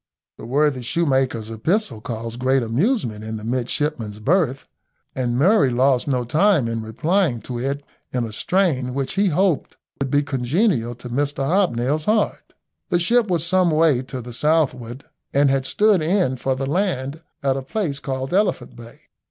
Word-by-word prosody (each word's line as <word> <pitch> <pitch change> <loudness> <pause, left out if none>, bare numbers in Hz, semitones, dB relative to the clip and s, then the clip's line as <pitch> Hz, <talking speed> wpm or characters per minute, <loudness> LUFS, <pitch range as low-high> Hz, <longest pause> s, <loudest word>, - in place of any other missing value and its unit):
The - - -8
worthy 140 0 +1
shoe 170 +8 0
maker's 130 -6 0
epistle 115 - -1
caused 115 +1 -5
great 130 0 +2
amusement 120 - 0
in 110 0 -5
the 105 - -9
midshipmen's 120 -1 -2
berth, 135 - +1 0.5
and 125 -2 -1
Murray 155 - +4
lost 125 +1 +2
no 130 -3 0
time 155 - +3
in 115 0 -2
replying 150 - 0
to 125 -2 -5
it 140 +3 -2 0.3
in 125 -1 -1
a 115 - -5
strain 135 - 0
which 135 -1 -2
he 200 +1 +2
hoped 180 -1 0 0.2
would 140 -1 -1
be 145 +2 +2
congenial 135 - 0
to 125 +1 -10
Mr 140 +2 -1
Hobnail's 150 -4 +1
heart. 215 -1 0 0.4
The 175 - +2
ship 225 +7 +2
was 170 -4 0
some 185 0 +3
way 155 -5 +3
to 130 -1 -7
the 120 0 -8
southward, 135 -4 0 0.3
and 140 -1 +4
had 135 -1 0
stood 210 -4 +3
in 170 -4 +1
for 130 +1 -1
the 135 +1 -3
land 155 -3 -1 0.2
at 135 -1 +2
a 135 - -3
place 145 0 -3
called 135 +1 -4
Elephant 195 - 0
Bay. 115 0 -13
135 Hz, 170 wpm, -21 LUFS, 125-170 Hz, 0.5 s, Murray